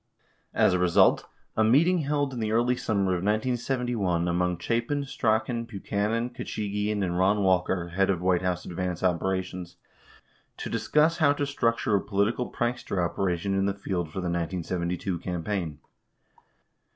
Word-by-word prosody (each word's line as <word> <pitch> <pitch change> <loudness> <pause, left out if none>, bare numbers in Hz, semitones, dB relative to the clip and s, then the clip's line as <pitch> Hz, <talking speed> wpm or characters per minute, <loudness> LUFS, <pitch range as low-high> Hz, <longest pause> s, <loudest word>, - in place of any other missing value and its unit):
As - - +4
a 90 - +1
result, 90 -1 +4 0.3
a 110 - +3
meeting 160 +11 +4
held 145 -2 0
in 125 - -4
the 110 -1 -1
early 120 +3 +2
summer 100 -5 0
of - - +1
1971 110 -4 0
among 90 0 0
Chapin, 120 - -1
Strachan, 115 -1 0
Buchanan, 110 +2 -2
Khachigian, 105 -2 -2
and 90 -2 -1
Eon 100 +3 +2
Walker, 90 -2 +1
head 95 +3 +1
of 95 -3 +1
White 90 0 +2
House 90 -1 -2
advance 90 0 -3
operations, 90 0 -1 0.8
to - - -5
discuss 150 +9 +2
how 145 -3 +5
to 145 0 -1
structure 115 -5 +1
a 100 - +2
politi 100 +2 +1
cal 125 - -3
prankster 120 -4 -2
operation 90 +1 0
in 95 0 +1
the 100 - -1
field 90 -4 -3
for 85 +5 -5
the - - -4
1972 85 +1 -2
campaign. 90 -2 -3
100 Hz, 150 wpm, -27 LUFS, 90-115 Hz, 0.8 s, how